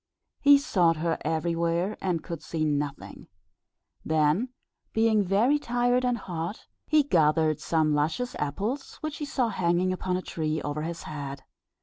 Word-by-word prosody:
He 285 0 +7
sought 175 - +2
her 165 +1 -1
everywhere, 170 +4 0
and 180 -4 -1
could 170 -3 -6
see 155 0 -2
nothing; 145 -2 -3 0.8
then 160 +9 +2 0.4
being 220 -1 +3
very 220 +10 +3
tired 245 -1 +1
and 245 -1 +1
hot, 175 0 -5 0.2
he 310 -1 +4
gathered 155 - +2
some 155 -2 +1
luscious 160 +12 -1
apples 205 - -3
which 310 -1 -4
he 295 - -4
saw 265 -5 0
hanging 180 -1 +1
upon 185 0 -1
a 185 - -5
tree 155 -1 -2
over 145 +1 -3
his 165 +2 -5
head. 140 -2 -6
170 Hz, 145 wpm, -27 LUFS, 155-230 Hz, 0.8 s, He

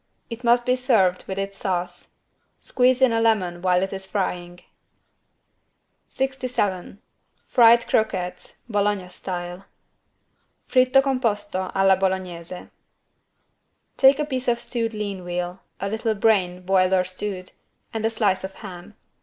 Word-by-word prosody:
It 230 +2 -7
must 240 0 +3
be 250 - +3
served 215 -8 +2
with 190 - -4
its 195 0 -4
sauce. 175 -2 -4 0.4
Squeeze 255 0 +2
in 250 -3 +5
a 225 - +1
lemon 185 -6 +1
while 180 0 +2
it 195 - -3
is 190 0 -5
frying. 175 -3 -3 1.5
67 250 -9 -2 0.5
FRIED 235 -1 +5
CROQUETTES, 180 -4 -2
BOLOGNA 205 -4 -1
STYLE 180 0 -6 1.0
(Fritto 255 +1 +4
composto 210 -8 -1
alla 195 0 +5
Bolognese) 185 -2 -3 1.3
Take 270 0 +6
a 300 - -1
piece 260 -3 -4
of 235 -1 +2
stewed 230 -3 -3
lean 200 -3 -4
veal, 175 +1 -4 0.2
a 200 - -2
little 220 +2 -1
brain 190 -4 +1
boiled 185 0 +2
or 185 -1 +4
stewed, 185 0 -6 0.4
and 225 -1 -3
a 225 - +2
slice 210 -4 0
of 190 0 -6
ham. 195 0 -10
195 Hz, 130 wpm, -23 LUFS, 185-230 Hz, 1.5 s, Take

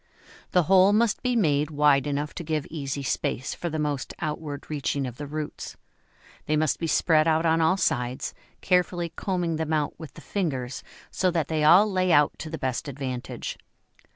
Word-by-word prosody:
The 180 - +3
hole 190 +3 +5
must 220 0 +2
be 250 -1 0
made 150 -8 +2
wide 145 -2 +3
enough 145 +1 -2
to 175 - -6
give 155 -2 -2
easy 140 -3 -4
space 135 0 -2
for 175 - -4
the 155 - -3
most 145 -3 -2
outward 150 -2 -5
reaching 140 -2 -2
of 125 -1 -7
the 145 - -6
roots; 150 +1 -6 0.7
they 155 - +2
must 155 -1 +1
be 165 - -2
spread 155 0 +3
out 160 +1 +2
on 165 0 +3
all 160 +4 +3
sides, 125 -6 -1 0.3
carefully 180 -2 +1
combing 175 -3 -2
them 160 0 -2
out 150 -2 0
with 160 -4 -10
the - - -11
fingers, 135 -10 -3 0.3
so 185 - +1
that 165 -4 -1
they 155 -1 0
all 175 +7 +7
lay 185 -3 +1
out 145 -2 +5
to 160 - -6
the 160 - -5
best 130 0 -3
advantage. 130 -2 -5
155 Hz, 185 wpm, -26 LUFS, 145-170 Hz, 0.7 s, all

